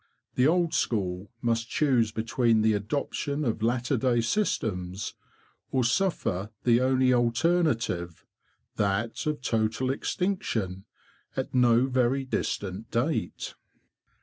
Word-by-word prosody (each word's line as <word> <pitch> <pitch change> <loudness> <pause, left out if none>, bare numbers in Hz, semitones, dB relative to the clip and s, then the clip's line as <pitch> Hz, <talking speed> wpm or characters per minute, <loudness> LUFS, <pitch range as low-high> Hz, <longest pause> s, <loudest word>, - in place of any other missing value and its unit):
The 125 +2 +3
old 170 0 +2
school 95 -3 -1
must 115 0 0
choose 125 -7 +2
between 115 0 +1
the 110 0 +4
adoption 140 +6 -2
of 110 -2 -1
latter 120 +4 +1
day 120 -1 +2
systems, 105 - -1 0.6
or 130 -2 +1
suffer 120 - 0
the 120 0 +4
only 130 0 +3
alternative—that 115 - -1
of 150 -4 -1
total 115 +2 0
extinction 115 - -2 0.5
at 130 - -3
no 125 -1 +4
very 130 +1 +1
distant 105 -4 -3
date. 125 +7 -1
120 Hz, 105 wpm, -27 LUFS, 110-135 Hz, 0.6 s, the